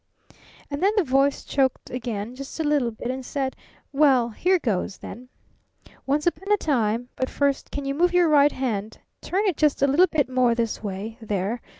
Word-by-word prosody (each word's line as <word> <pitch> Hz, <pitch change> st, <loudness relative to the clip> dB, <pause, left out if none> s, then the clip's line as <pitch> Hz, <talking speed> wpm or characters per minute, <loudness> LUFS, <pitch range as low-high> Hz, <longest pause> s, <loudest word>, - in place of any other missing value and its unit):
"And 285 Hz, -, -3 dB
then 400 Hz, +3 st, +3 dB
the 405 Hz, -, +4 dB
Voice 275 Hz, 0 st, +1 dB
choked 265 Hz, -2 st, -1 dB
again, 235 Hz, -3 st, -4 dB
just 275 Hz, +4 st, -9 dB
a -, -, +1 dB
little 295 Hz, -5 st, +2 dB
bit, 235 Hz, +2 st, -5 dB
and 260 Hz, 0 st, -5 dB
said: 265 Hz, 0 st, -3 dB, 0.4 s
'Well 270 Hz, -5 st, +4 dB
here 365 Hz, -, +2 dB
goes, 205 Hz, -, -2 dB
then. 250 Hz, +3 st, -10 dB, 0.8 s
Once 290 Hz, +2 st, +1 dB
upon 350 Hz, +4 st, -1 dB
a 415 Hz, -, +5 dB
time 245 Hz, -, 0 dB
but 260 Hz, -, -2 dB
first, 280 Hz, -1 st, 0 dB
can 285 Hz, -, -5 dB
you 275 Hz, -, -1 dB
move 350 Hz, +5 st, +2 dB
your 355 Hz, -1 st, +4 dB
right 295 Hz, -1 st, +5 dB
hand? 220 Hz, -5 st, -3 dB, 0.2 s
Turn 395 Hz, +4 st, -1 dB
it 375 Hz, -7 st, 0 dB
just 300 Hz, -3 st, +2 dB
a -, -, +5 dB
little 320 Hz, +7 st, +5 dB
bit 300 Hz, -6 st, 0 dB
more 255 Hz, -2 st, +2 dB
this 230 Hz, -2 st, -2 dB
way. 210 Hz, +3 st, -6 dB
There! 210 Hz, +2 st, -2 dB
270 Hz, 195 wpm, -24 LUFS, 235-300 Hz, 0.8 s, a